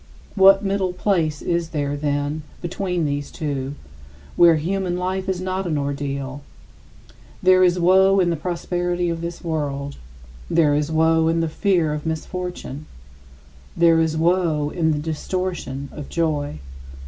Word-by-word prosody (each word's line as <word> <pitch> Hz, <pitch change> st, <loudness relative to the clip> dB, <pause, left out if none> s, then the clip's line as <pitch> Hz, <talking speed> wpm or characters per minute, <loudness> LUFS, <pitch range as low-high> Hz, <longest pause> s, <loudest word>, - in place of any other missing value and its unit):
What 195 Hz, 0 st, +6 dB
middle 195 Hz, -2 st, 0 dB
place 170 Hz, -5 st, 0 dB
is 170 Hz, -1 st, -1 dB
there, 145 Hz, -3 st, -2 dB
then, 145 Hz, +1 st, -1 dB, 0.2 s
between 180 Hz, -1 st, -2 dB
these 145 Hz, 0 st, -2 dB
two, 140 Hz, -3 st, -4 dB, 0.6 s
where 170 Hz, -1 st, +6 dB
human 180 Hz, +3 st, -1 dB
life 185 Hz, +1 st, -2 dB
is 185 Hz, -2 st, -1 dB
not 185 Hz, 0 st, -2 dB
an 155 Hz, -3 st, 0 dB
ordeal? 140 Hz, -1 st, -3 dB, 1.0 s
There 185 Hz, 0 st, +6 dB
is 180 Hz, 0 st, +3 dB
woe 190 Hz, +2 st, +5 dB
in 175 Hz, -2 st, +3 dB
the -, -, 0 dB
prosperity 175 Hz, +1 st, -2 dB
of 165 Hz, 0 st, -4 dB
this 170 Hz, +1 st, -6 dB
world; 145 Hz, -4 st, -3 dB, 0.5 s
there 155 Hz, -3 st, +3 dB
is 150 Hz, +1 st, 0 dB
woe 160 Hz, 0 st, +3 dB
in 165 Hz, +1 st, +2 dB
the 165 Hz, -, 0 dB
fear 165 Hz, -2 st, +1 dB
of 150 Hz, +1 st, -4 dB
misfortune; 160 Hz, -2 st, -5 dB, 0.9 s
there 165 Hz, -1 st, +5 dB
is 160 Hz, -1 st, 0 dB
woe 165 Hz, -3 st, +1 dB
in 160 Hz, -3 st, +1 dB
the 150 Hz, -, 0 dB
distortion 155 Hz, -3 st, -3 dB
of 150 Hz, -2 st, -8 dB
joy. 150 Hz, -, -1 dB
165 Hz, 145 wpm, -22 LUFS, 150-180 Hz, 1.0 s, What